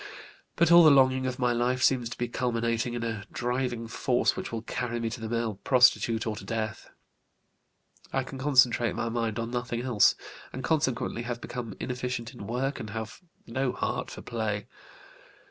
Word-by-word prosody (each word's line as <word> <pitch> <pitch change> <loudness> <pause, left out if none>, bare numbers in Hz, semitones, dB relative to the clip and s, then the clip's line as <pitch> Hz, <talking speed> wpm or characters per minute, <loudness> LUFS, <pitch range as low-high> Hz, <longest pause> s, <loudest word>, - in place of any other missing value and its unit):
But 170 0 +3
all 170 0 +9
the 155 - +9
longing 130 -2 +4
of 130 -1 -3
my 125 -2 +2
life 125 +2 0
seems 125 -2 +3
to - - -7
be 120 - -1
culminating 115 -1 -1
in 120 - -3
a 115 -3 -3
driving 125 -1 -2
force 115 - +1
which - - -5
will 115 -1 -4
carry 120 0 -3
me 115 -1 -2
to 120 0 -6
the 110 - -4
male 115 -3 -1
prostitute 120 -3 +4
or 110 -2 -2
to - - -8
death. 110 +1 -4 1.2
I - - 0
can 135 - -8
concentrate 125 -4 +4
my 115 - -2
mind 115 -2 -1
on 115 0 -3
nothing 120 -1 -2
else, 120 -5 +4 0.4
and 130 - -6
consequently 130 -7 0
have 120 0 -4
become 120 -4 -6
inefficient 125 -1 -4
in 100 -5 -9
work 130 +4 -2
and 105 - -6
have 110 - -6 0.2
no 130 +2 -1
heart - - -2
for - - -9
play. 110 -3 -2
120 Hz, 180 wpm, -28 LUFS, 115-130 Hz, 1.2 s, all